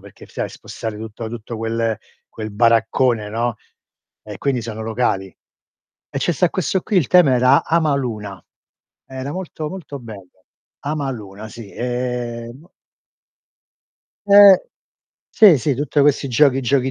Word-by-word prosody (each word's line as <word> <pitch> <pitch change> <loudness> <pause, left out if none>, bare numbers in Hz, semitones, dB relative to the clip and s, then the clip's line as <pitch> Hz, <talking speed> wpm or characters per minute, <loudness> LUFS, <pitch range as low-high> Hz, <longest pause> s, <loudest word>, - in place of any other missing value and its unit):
perché - - -15
stai - - -4
a - - -10
spostare 110 -2 -7
tutto 110 +1 -7
tutto 115 0 -7
quel 115 -1 -1 0.3
quel 110 -1 -7
baraccone, 115 +1 +2
no; 115 0 -2 0.7
e 105 -3 -9
quindi 130 -4 -1
sono 110 -1 -6
locali. 110 -4 -1 0.8
E 140 - -3
ce 175 - 0
sta 170 +3 +2
questo 185 +1 -1
qui 210 - -1
il 155 -9 +3
tema 175 -8 +5
era 130 +3 +4
Amaluna. 130 - -1 0.6
Era 130 +2 -6
molto, 170 -4 -5
molto 165 -7 -8
bello. 100 -5 -13 0.4
Amaluna, 120 -9 -5
sì. 115 -4 -11
Ehm 125 +3 -4 1.6
Eh. 200 -2 +8 0.7
Sì, 190 -10 +7
sì, 140 +2 0
tutte 145 +2 0
questi 140 -1 +3
giochi 135 +2 +3
giochi 130 +1 +1
125 Hz, 130 wpm, -20 LUFS, 110-145 Hz, 1.6 s, Eh